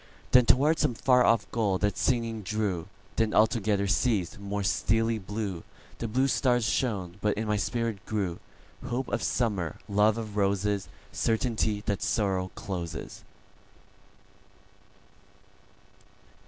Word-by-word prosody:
Then 125 -2 +6
toward 150 +5 +4
some 120 - +1
far 125 +1 +4
off 115 -4 +3
goal 105 -5 +1
that 100 0 0
singing 115 -3 0
drew; 100 -4 -2 0.3
Then 110 -1 +1
altogether 105 -2 +3
ceas'd; 100 -3 0
more 100 0 -3
steely 115 +2 +1
blueThe 100 -3 -4 0.5
blue 130 +4 +2
stars 120 -1 +2
shone; 100 -6 -1
but 105 -1 +1
in 110 +1 -2
my 105 - +1
spirit 115 -1 -2
grewHope 110 +5 -5
of 120 - -1
Summer, 100 -9 -1
love 105 +1 +3
of 110 -2 -5
Roses, 100 0 +1 0.2
Certainty 110 -2 0
that 100 -2 -1
Sorrow 95 -4 0
closes. 85 -4 -6
105 Hz, 115 wpm, -28 LUFS, 100-115 Hz, 0.5 s, Then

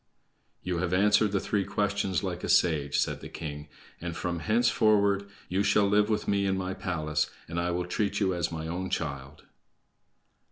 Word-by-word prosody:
"You 90 -2 -1
have 90 0 0
answered 105 +2 +4
the 100 - +1
three 100 0 0
questions 100 -2 -1
like 90 -2 -4
a - - -3
sage," 75 -5 +3
said - - 0
the - - -8
king, 75 -2 -6 0.3
"and 85 -1 -4
from 85 -1 -2
henceforward 105 -2 +2 0.2
you 95 +2 0
shall 100 0 +3
live 105 +1 +3
with 105 - -1
me 100 -1 +1
in 95 0 +1
my 95 0 -2
palace, 75 -5 -1 0.2
and 85 +1 -3
I 85 +1 0
will 90 0 -1
treat 100 +3 -1
you 95 -3 +2
as 85 -1 -1
my 80 -1 -4
own 90 +3 -3
child." 70 -4 -4
90 Hz, 185 wpm, -28 LUFS, 85-100 Hz, 0.3 s, answered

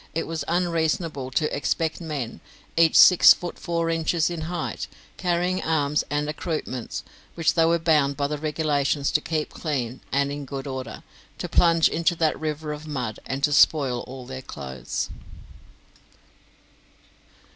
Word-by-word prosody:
It 165 - -1
was 165 -1 -4
unreasonable 165 -5 0
to 150 +4 0
expect 160 +4 -1
men, 145 -8 -5 0.3
each 165 -1 +4
six 180 - +9
foot 175 - -7
four 170 -2 -1
inches 165 0 +1
in 170 -2 -4
height, 175 -2 -3 0.3
carrying 180 +1 0
arms 150 -2 +1
and 145 +1 -1
accoutrements, 150 -5 -4 0.3
which 165 -2 +2
they 165 -1 +4
were 170 +1 +3
bound 150 -4 +2
by 140 - 0
the 150 +1 -3
regulations 150 -2 0
to 150 - +2
keep 155 -1 -2
clean 130 -6 -3
and 140 +1 +1
in 145 0 -5
good 135 0 -6
order, 130 -5 -6 0.3
to - - -4
plunge 165 -1 +4
into 170 +1 +1
that 160 -2 +1
river 155 -1 -3
of 150 +1 -9
mud, 125 -7 -4
and 135 +1 -4
to 145 - +3
spoil 140 -4 +4
all 130 0 -9
their 130 +1 -7
clothes. 65 - -5
150 Hz, 150 wpm, -24 LUFS, 140-165 Hz, 0.3 s, six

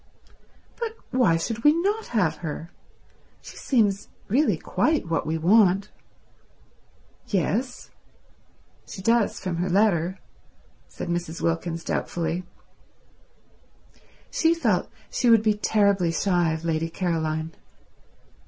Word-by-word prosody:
"But 455 -2 -4
why 240 -11 +3
should 225 +7 -4
we 295 - +7
not 405 +7 -1
have 180 -9 0
her? 165 0 -6 0.7
She - - -11
seems 205 -7 +1 0.2
really 275 +9 +2
quite 310 - 0
what 165 -2 -1
we 160 +1 0
want." 195 +3 +3 1.4
"Yes—she 200 - -6
does 230 0 +2
from 185 -3 -3
her 180 +2 -1
letter," 185 -2 +2 0.7
said - - -7
Mrs. 170 -1 -3
Wilkins 165 0 -1
doubtfully. 175 +2 -2 1.9
She 330 +1 +2
felt 330 - 0 0.2
she 245 - +1
would 225 -2 +6
be 215 -1 +3
terribly 200 -4 +2
shy 175 -1 +1
of 160 +1 -5
Lady 165 0 -1
Caroline. 160 -2 -2
185 Hz, 105 wpm, -25 LUFS, 165-230 Hz, 1.9 s, we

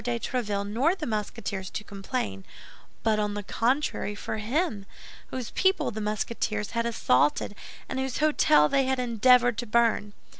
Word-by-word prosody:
de 240 0 -1
Tréville 205 -5 -2
nor 260 - +2
the 335 - -5
Musketeers 210 -4 -3
to 210 - -5
complain, 195 - -4 0.6
but, 220 -1 +2
on 210 -1 -1
the 205 - -4
contrary, 235 -1 0
for 215 +1 -4
him, 220 - -1 0.4
whose 255 -3 -5
people 380 0 +2
the 220 0 -5
Musketeers 210 0 -2
had 230 0 0
assaulted 145 - +2 0.3
and 260 - -3
whose 265 -1 -2
hôtel 300 - +4
they 270 -1 +3
had 265 0 +1
endeavored 245 0 +4
to 240 - -4
burn. 220 -2 +2
225 Hz, 155 wpm, -27 LUFS, 205-255 Hz, 0.6 s, hôtel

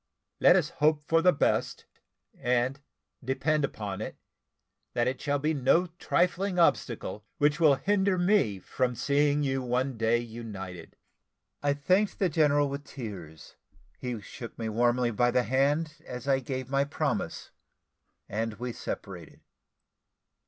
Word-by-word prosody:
Let - - +7
us - - +2
hope 150 0 +1
for 165 +2 +2
the 180 +1 +6
best, 145 - 0 0.5
and, 125 +3 0 0.4
depend 150 +4 0
upon 105 -6 -4
it, - - -5 0.8
that 120 0 +1
it 130 0 -2
shall 145 -1 0
be 155 +3 0
no 155 +6 +3
trifling 180 +2 +1
obstacle 115 - +1
which 145 +2 +2
will 155 -4 +6
hinder 195 +5 +1
me 175 - +2
from 125 +6 -2
seeing 145 +3 +2
you 135 -1 0
one 125 +1 -1
day 115 +1 +2
united." 110 -6 -7 0.7
I 145 0 +2
thanked 185 +8 +1
the 190 - +2
general 145 -2 +3
with 140 +1 -5
tears: 90 - -9 0.4
he 125 -3 -4
shook 115 +3 -9
me 115 -1 -3
warmly 120 +2 +2
by 120 +3 +2
the 125 0 +2
hand 150 +5 0
as 125 -1 -8
I 135 -1 +3
gave 130 -1 -4
my 140 +1 +2
promise, 145 - -3 0.8
and 110 +1 -3
we 120 +2 -5
separated. 90 -8 -7
135 Hz, 140 wpm, -28 LUFS, 120-150 Hz, 0.8 s, Let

